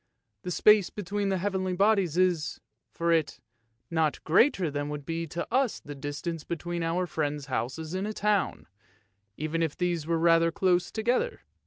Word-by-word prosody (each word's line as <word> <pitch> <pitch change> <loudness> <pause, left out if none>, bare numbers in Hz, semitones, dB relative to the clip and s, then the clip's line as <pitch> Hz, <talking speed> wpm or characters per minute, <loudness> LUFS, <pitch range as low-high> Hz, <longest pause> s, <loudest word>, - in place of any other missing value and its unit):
The 180 - -5
space 210 +2 +5
between 205 0 -3
the 190 - +1
heavenly 190 0 -1
bodies 195 -3 +2
is, 175 -4 +1 0.3
for 170 0 -1
it, 160 -3 +1 0.5
not 160 -3 0
greater 185 - +3
than 145 0 -3
would 150 -1 -5
be 165 +1 -3
to 170 +3 -4
us 260 -2 +2
the 145 - -9
distance 145 +3 -5
between 170 +1 -4
our 165 +2 0
friends' 150 -3 -2
houses 135 +5 -3
in 190 +2 -2
a 215 - -3
town, 210 -1 0 0.7
even 155 +2 -2
if 160 -3 -1
these 175 -3 -1
were 165 0 +1
rather 165 0 +4
close 180 0 +1
together. 245 - 0
170 Hz, 165 wpm, -28 LUFS, 155-190 Hz, 0.7 s, space